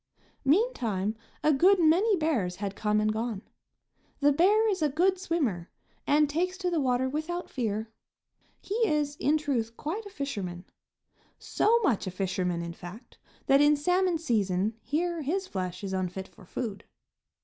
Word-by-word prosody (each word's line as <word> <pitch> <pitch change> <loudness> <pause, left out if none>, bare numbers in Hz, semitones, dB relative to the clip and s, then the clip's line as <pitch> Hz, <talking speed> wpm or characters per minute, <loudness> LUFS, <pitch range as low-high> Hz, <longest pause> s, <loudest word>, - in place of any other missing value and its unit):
Meantime 235 - +1 0.3
a 305 - +4
good 370 +8 +5
many 355 +7 +4
bears 275 - 0
had 200 0 -4
come 210 0 +1
and 215 0 +1
gone. 220 -2 -3 0.8
The 290 0 +4
bear 405 +9 +4
is 390 -5 0
a 305 - +3
good 365 +6 +2
swimmer, 275 - -1 0.4
and 295 +1 +4
takes 360 +6 -1
to 365 -2 -2
the 335 - +1
water 260 -1 +1
without 315 +6 -4
fear. 220 -3 -2 0.7
He - - -6
is, 295 -3 0
in 300 +3 +2
truth, 240 -7 -2
quite 405 +8 -4
a - - -9
fisherman; 200 - -5 0.7
so 460 +2 +2
much 235 - +1
of 185 - -4
a - - -24
fisherman, 180 -2 -1
in 170 0 -5
fact, 180 +7 -12 0.3
that 275 +1 +5
in 295 +1 +5
salmon 360 +3 +2
season 210 - 0
here 340 +2 -1
his 365 +7 -1
flesh 185 - -5
is 195 -1 -3
unfit 185 0 -3
for 185 - -18
food. 215 -2 -5
280 Hz, 160 wpm, -28 LUFS, -, 0.8 s, good